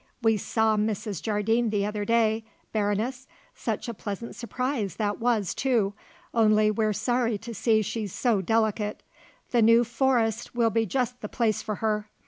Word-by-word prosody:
We 225 -1 +4
saw 220 +1 +1
Mrs. 210 -2 -2
Jardine 225 +2 +1
the 205 -1 0
other 210 0 -3
day, 225 0 +2 0.3
Baroness 220 +5 -1 0.3
such - - -3
a 235 - -3
pleasant 205 +3 -6
surprise 245 -3 -2
that 205 -2 -1
was, 225 -5 +1
too 230 -7 +1 0.4
only 215 -2 +4
we're 215 0 +1
sorry 230 +1 0
to 230 +3 -8
see 220 0 +2
she's 210 -1 -4
so 225 -3 +1
delicate. 215 0 0 0.5
The 240 - +3
New 230 +2 +6
Forest 235 -2 0
will 230 -2 +3
be 225 0 +1
just 250 +3 -1
the 210 - -5
place 220 -4 0
for 215 -2 -3
her. 210 0 -1
220 Hz, 160 wpm, -26 LUFS, 210-235 Hz, 0.5 s, New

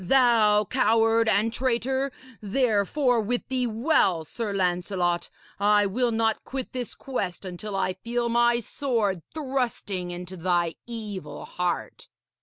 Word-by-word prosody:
Thou 220 -2 +4
coward 225 -1 +3
and 220 +3 +2
traitor! 260 +2 0 0.3
Therefore, 235 +3 +2
wit 245 +3 -2
thee 255 -1 0
well, 220 - +2
Sir 225 +5 -4
Lancelot, 180 -2 0 0.3
I 205 0 +4
will 240 +5 +1
not 225 -1 0
quit 265 -1 -5
this 250 -3 -4
quest 200 -9 -4
until 190 +3 -5
I 185 -1 0
feel 235 +5 -2
my 240 0 +3
sword 220 -7 -1
thrusting 250 - -2
into 180 +1 -7
thy 175 -1 +1
evil 215 -5 -6
heart.' 180 -1 -3
220 Hz, 125 wpm, -26 LUFS, 190-245 Hz, 0.3 s, Thou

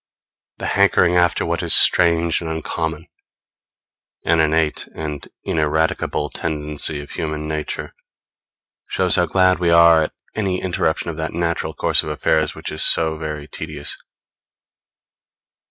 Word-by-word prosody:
The - - -6
hankering 85 - +3
after 85 -1 +2
what - - -1
is - - +5
strange 85 0 +4
and 80 - -5
uncommon 80 0 -3 1.2
an 85 0 +3
innate 80 0 +1
and 75 -2 -6 0.2
ineradicable 80 -1 -1
tendency 75 -1 -2
of 70 - -14
human 75 -1 -4
nature 75 -1 -4 1.0
shows 90 -2 +3
how 85 - +2
glad 95 +3 +3
we 85 -1 +1
are 85 -1 +6
at - - -8 0.2
any 95 -4 -1
interruption 85 -2 -1
of 80 - -10
that 80 0 -3
natural 85 0 -2
course - - +2
of - - -6
affairs 75 0 0
which - - -7
is 75 - -5
so 80 -1 +2
very 75 -2 -5
tedious. 75 -2 -5
80 Hz, 135 wpm, -20 LUFS, 75-85 Hz, 1.2 s, are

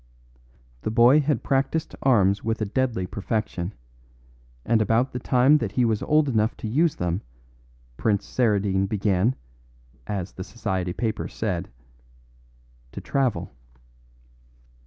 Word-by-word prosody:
The - - -2
boy 120 +6 +6
had 145 -5 0
practised 140 +4 0
arms 100 -7 +3
with 115 0 -1
a 110 - 0
deadly 115 -3 -1
perfection, 100 -2 -3 0.9
and 115 0 +3
about 115 +4 +1
the 125 - -3
time 130 +5 +4
that 105 -5 -3
he 125 - +2
was 110 -2 0
old 150 -1 +3
enough 110 -3 +1
to - - -5
use 150 +7 +2
them 90 +2 -2 0.8
Prince 105 -2 0
Saradine 100 -5 +1
began, 100 +3 +1 0.7
as 95 -3 -3
the 95 - -7
society 95 -4 -3
papers 110 0 -3
said, 95 -5 -2 1.2
to - - -5
travel. 130 -5 -1
110 Hz, 125 wpm, -24 LUFS, 100-125 Hz, 1.2 s, boy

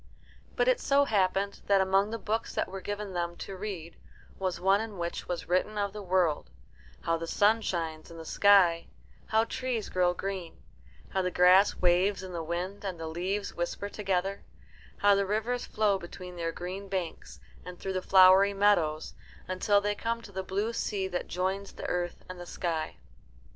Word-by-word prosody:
But - - +2
it - - +4
so 280 0 +3
happened 200 -2 0
that 200 -1 +5
among 195 +2 +3
the 230 - -3
books 225 +1 -3
that - - 0
were 195 0 -7
given 205 -1 -5
them 175 -1 -2
to 195 - -7
read 185 -4 -6 0.4
was 185 -2 -2
one 195 +3 +3
in 220 -3 -6
which 170 0 -4
was 175 -3 -4
written 185 +4 0
of 200 -1 -1
the 210 - -6
world: 180 -5 +1 0.5
how 165 0 0
the 165 0 -5
sun 215 +6 +3
shines 165 -5 -3
in 170 - -11
the 165 - -8
sky; 185 -3 +4 0.4
how 220 0 +3
trees 235 -2 -3
grow 180 -1 +2
green; 190 -4 -5 0.5
how 190 - 0
the 180 - 0
grass 180 +3 +5
waves 185 +2 +2
in 185 -1 -7
the 170 - -3
wind 175 +5 -4
and 185 -4 -4
the 165 - -5
leaves 185 +5 -3
whisper 175 +4 -3
together; 195 -1 -1 0.6
how 205 0 +5
the 200 0 +1
rivers 225 +4 -1
flow 210 -2 +1
between 180 0 -9
their 165 -1 -2
green 185 +4 -6
banks 185 -4 -4 0.2
and 180 -1 -9
through 190 - -3
the 185 - -1
flowery 190 +2 +6
meadows, 175 -7 +2 0.3
until 185 +2 +2
they 205 0 0
come 230 +2 -2
to 200 - -11
the 190 0 -3
blue 200 +5 -2
sea 200 -4 -2
that 180 - -3
joins 190 +2 -2
the - - -8
earth 175 -1 -2
and 185 -1 -8
the 175 - -8
sky. 165 -3 -3
190 Hz, 185 wpm, -29 LUFS, 175-205 Hz, 0.6 s, flowery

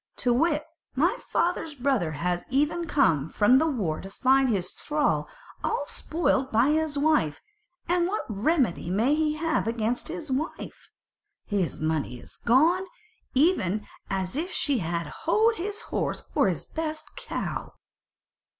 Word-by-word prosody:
To 245 - +1
wit, 300 +3 +2 0.3
my 315 +7 +3
father's 335 -3 0
brother 250 - 0
has 175 +4 -1
even 295 +6 +1
now 335 - -4
come 160 - +2
from 235 +9 +4
the 320 - +2
war 200 - -1
to 195 - -8
find 265 +5 +3
his 190 -5 -1
thrall 300 -1 0 0.3
all 460 +2 0
spoilt 280 -5 0
by 230 +5 +4
his 310 -1 0
wife: 280 - +2 0.5
and 350 0 +2
what 420 +3 -2
remedy 220 - 0
may 225 +10 +2
he 305 0 +1
have 320 -5 0
against 230 +1 -1
his 305 -4 -5
wife? 295 +6 -4 0.6
his 195 -5 -1
money 155 -5 -1
is - - -10
gone, 330 +10 +3 0.5
even 215 - +2 0.2
as 190 +2 -2
if 330 +5 -2
she 280 -5 +1
had 170 -1 -2 0.2
houghed 445 +6 +4
his 410 +4 -3
horse - - -2
or - - +3
his - - -1
best 315 -1 -5
cow." - - -4
270 Hz, 150 wpm, -27 LUFS, 200-315 Hz, 0.6 s, from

